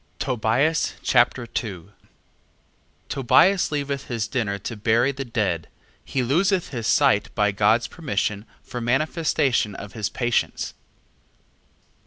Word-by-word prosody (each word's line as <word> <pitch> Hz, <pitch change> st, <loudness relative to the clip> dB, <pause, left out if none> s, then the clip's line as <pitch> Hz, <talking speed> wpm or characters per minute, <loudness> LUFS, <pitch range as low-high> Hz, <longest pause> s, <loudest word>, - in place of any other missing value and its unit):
Tobias 130 Hz, +6 st, +1 dB
Chapter 120 Hz, 0 st, +3 dB
2 105 Hz, -6 st, -5 dB, 1.2 s
Tobias 175 Hz, +9 st, +3 dB
leaveth 140 Hz, -2 st, -3 dB
his 115 Hz, -3 st, -2 dB
dinner 105 Hz, -6 st, -1 dB
to 110 Hz, +4 st, -6 dB
bury 115 Hz, +5 st, +2 dB
the 135 Hz, 0 st, -5 dB
dead: 105 Hz, -, -1 dB, 0.4 s
he 130 Hz, -, -2 dB
loseth 180 Hz, -, +1 dB
his 115 Hz, -5 st, -4 dB
sight 105 Hz, 0 st, +3 dB
by 105 Hz, 0 st, +2 dB
God's 110 Hz, +4 st, +3 dB
permission, 105 Hz, -, -3 dB, 0.2 s
for 125 Hz, -, -6 dB
manifestation 135 Hz, -, +1 dB
of 100 Hz, 0 st, -9 dB
his 110 Hz, -3 st, -2 dB
patience. 120 Hz, -1 st, -1 dB
120 Hz, 115 wpm, -23 LUFS, 105-140 Hz, 1.2 s, Chapter